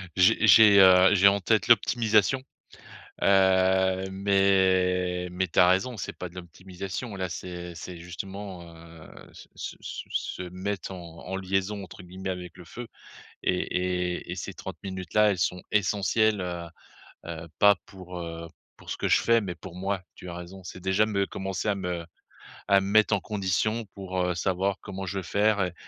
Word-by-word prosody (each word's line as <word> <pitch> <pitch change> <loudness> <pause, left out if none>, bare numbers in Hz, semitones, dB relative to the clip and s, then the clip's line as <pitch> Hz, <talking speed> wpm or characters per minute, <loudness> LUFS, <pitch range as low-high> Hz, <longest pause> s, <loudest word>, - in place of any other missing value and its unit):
j'ai 100 +5 +4
j'ai, 105 -2 +8
heu, 95 +1 +7
j'ai 100 0 +6
en 100 +1 +4
tête 110 +2 +1
l'optimisation. 115 +2 +3 0.8
Heu, 95 -1 +3
mais 95 -2 +2
mais 90 +1 -2
tu - - -4
as 90 +1 +7
raison, 95 +7 +1
c'est - - -6
pas 90 - -6
de 85 - -20
l'optimisation 95 +5 -7
là, 95 -1 -3
c'est 90 0 -7
c'est 90 +1 -8
justement, 95 +2 -7
heu, 80 -1 -14 0.2
se - - -14
se - - -6
se - - -7 0.3
se - - -5
mettre 95 +1 -4
en 85 -3 -10
en 95 +1 -3
«liaison», 95 +1 -2
entre 90 - -12
guillemets, 95 +2 -6
avec 90 -2 -7
le 90 - -12
feu. 120 +8 -8 0.6
Et 90 - +1 0.6
et - - -9
et - - -3
ces - - -6
30 - - -8
minutes 95 -3 -6
là, 105 -1 +5
elles 95 - -3
sont 90 -1 -1
essentielles, 105 +1 +2
heu, 90 -1 -4 0.6
heu, 80 -1 -6
pas 100 0 +7
pour, 90 -2 -10
heu, 85 -1 -6 0.3
pour - - -14
ce - - -3
que - - -1
je - - +4
fais, 115 0 +4
mais 95 -4 -5
pour 85 +1 -11
moi, 95 +1 -2
tu - - -11
as 85 - -6
raison. 90 +2 -9
C'est 90 - -9
déjà 95 +3 +2
me 100 -2 0
commencer 95 +2 -3
à 100 - +1
me 90 -3 -4 0.6
à 100 -1 +5
me 95 - -4
mettre 110 +1 +4
en - - +2
condition 105 +3 -1
pour, 95 -2 -6
heu, 90 0 0
savoir 95 +2 -1
comment 95 -1 -6
je 95 +1 -3
vais - - -6
faire 105 +3 +1
et 90 - -5
95 Hz, 185 wpm, -27 LUFS, 90-100 Hz, 0.8 s, j'ai